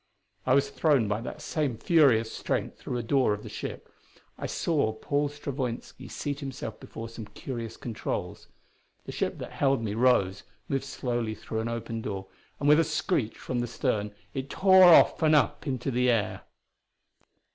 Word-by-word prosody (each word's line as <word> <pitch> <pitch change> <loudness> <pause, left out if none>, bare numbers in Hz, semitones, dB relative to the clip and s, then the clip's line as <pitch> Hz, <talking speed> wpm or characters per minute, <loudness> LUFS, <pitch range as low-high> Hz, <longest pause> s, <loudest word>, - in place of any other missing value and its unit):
I 130 - +5
was 140 - +2
thrown 140 -9 +3
by 105 +2 -1
that 150 +5 -7
same 150 -6 -1
furious 125 -8 +4
strength - - -3
through 125 - -4
a 120 - -3
door 125 -3 +2
of 105 - -11
the - - -8
ship; - - -6 0.5
I - - -5
saw 145 -10 0
Paul 145 +6 -1
Stravoinski 135 -4 -5
seat 145 -1 -4
himself 135 -6 -6
before 115 0 -8
some 115 -1 -9
curious 115 -4 -6
controls. 115 -3 -4 0.6
The - - -6
ship - - -2
that - - -7
held 135 -4 +1
me 105 -2 -2
rose; 105 -5 +3 0.3
moved 135 -2 -1
slowly 120 -3 -2
through 110 - -5
an 115 +1 -2
opened 115 -1 -4
door; 100 -3 -4 0.3
and 145 - 0
with 150 +2 +7
a - - +5
screech 155 - -1
from 125 - -3
the 120 - -1
stern 110 -4 -1 0.2
it 135 +1 -4
tore 190 +2 +6
off 175 0 +7
and 155 -1 +5
up 150 - +1
into 130 0 -2
the 125 0 +2
air. 115 -4 0
125 Hz, 175 wpm, -28 LUFS, 115-145 Hz, 0.6 s, with